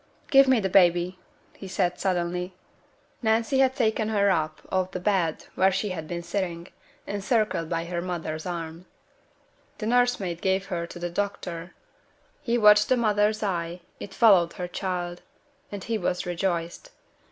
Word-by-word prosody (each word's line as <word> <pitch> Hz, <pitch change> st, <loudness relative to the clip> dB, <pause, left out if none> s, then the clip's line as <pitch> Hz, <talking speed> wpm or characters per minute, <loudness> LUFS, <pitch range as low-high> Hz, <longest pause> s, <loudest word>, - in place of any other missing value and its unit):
'Give 275 Hz, 0 st, +7 dB
me 260 Hz, -2 st, +4 dB
baby!' 180 Hz, -2 st, +3 dB, 0.4 s
he 195 Hz, -, -9 dB
said, 180 Hz, -2 st, -1 dB
suddenly. 180 Hz, 0 st, -1 dB, 0.7 s
Nancy 230 Hz, +3 st, +2 dB
had 260 Hz, -1 st, +3 dB
taken 220 Hz, -3 st, +1 dB
her 200 Hz, -2 st, +3 dB
up 155 Hz, -3 st, -1 dB
off 185 Hz, -1 st, +1 dB
the 185 Hz, -, -5 dB
bed 180 Hz, -4 st, 0 dB
where 190 Hz, +1 st, +3 dB
she 195 Hz, +2 st, -1 dB
had 160 Hz, -4 st, -5 dB
been 170 Hz, +1 st, -4 dB
sitting, 170 Hz, -1 st, -3 dB, 0.4 s
encircled 205 Hz, -4 st, 0 dB
by 165 Hz, -1 st, -2 dB
her 170 Hz, 0 st, -3 dB
mother's 170 Hz, -2 st, -4 dB
arm. 170 Hz, 0 st, -6 dB, 0.9 s
The 215 Hz, -, -5 dB
nursemaid 230 Hz, -7 st, +1 dB
gave 190 Hz, 0 st, +1 dB
her 170 Hz, -1 st, -2 dB
to -, -, -10 dB
the 175 Hz, 0 st, -4 dB
doctor. 180 Hz, -3 st, -4 dB, 0.7 s
He 240 Hz, -4 st, 0 dB
watched 210 Hz, -2 st, +6 dB
the 255 Hz, -, +4 dB
mother's 215 Hz, -1 st, +2 dB
eye, 175 Hz, -3 st, -2 dB, 0.2 s
it 195 Hz, -, -8 dB
followed 190 Hz, -7 st, +5 dB
her 180 Hz, -, -5 dB
child, 175 Hz, -1 st, -4 dB, 0.5 s
and 200 Hz, -2 st, -6 dB
he 225 Hz, -1 st, -2 dB
was 180 Hz, -1 st, -1 dB
rejoiced. 175 Hz, -, -2 dB
185 Hz, 150 wpm, -26 LUFS, 175-210 Hz, 0.9 s, Give